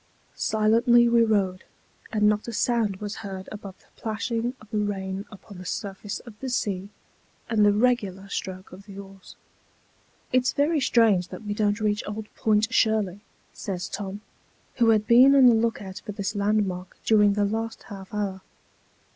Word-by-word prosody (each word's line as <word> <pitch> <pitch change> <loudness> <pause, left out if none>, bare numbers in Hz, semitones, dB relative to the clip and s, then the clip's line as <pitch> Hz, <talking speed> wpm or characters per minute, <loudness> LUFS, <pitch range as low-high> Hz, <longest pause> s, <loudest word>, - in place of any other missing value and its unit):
Silently 230 +3 +3
we 235 0 +4
rowed, 195 -4 0 0.5
and 215 -1 0
not 210 +1 +2
a - - -3
sound 225 -3 +1
was 205 +2 -6
heard 190 -3 -7
above 200 -3 -8
the - - -28
plashing 230 +2 -2
of 215 - -16
the 215 - 0
rain 195 -1 -3
upon 200 -2 -12
the - - -8
surface 200 +1 -5
of 235 - -12
the 265 - -4
sea, 200 -5 -2 0.6
and 220 -2 +2
the 205 - +6
regular 205 -4 0
stroke 185 -1 -6
of 195 +3 -13
the 195 -1 -10
oars. 195 -1 -12 1.0
"It's 255 0 +2
very 300 +2 +2
strange 220 -8 +3
that - - -9
we 205 -1 -3
don't 205 0 0
reach 210 -1 0
old 210 +1 -6
Point 220 +2 +1
Shirley," 215 -6 +2 0.3
says 185 -3 -5
Tom, 200 0 -6 0.6
who 235 -2 +4
had 215 -1 +3
been 255 +5 +7
on 270 -2 +7
the 245 - +8
look 225 -1 0
out 190 +1 -8
for 210 - -6
this 200 0 -3
landmark 200 -3 -1
during 210 -2 +5
the 205 0 +1
last 225 +2 -3
half 195 -2 -10
hour. 200 -2 -3
210 Hz, 170 wpm, -25 LUFS, 195-225 Hz, 1.0 s, the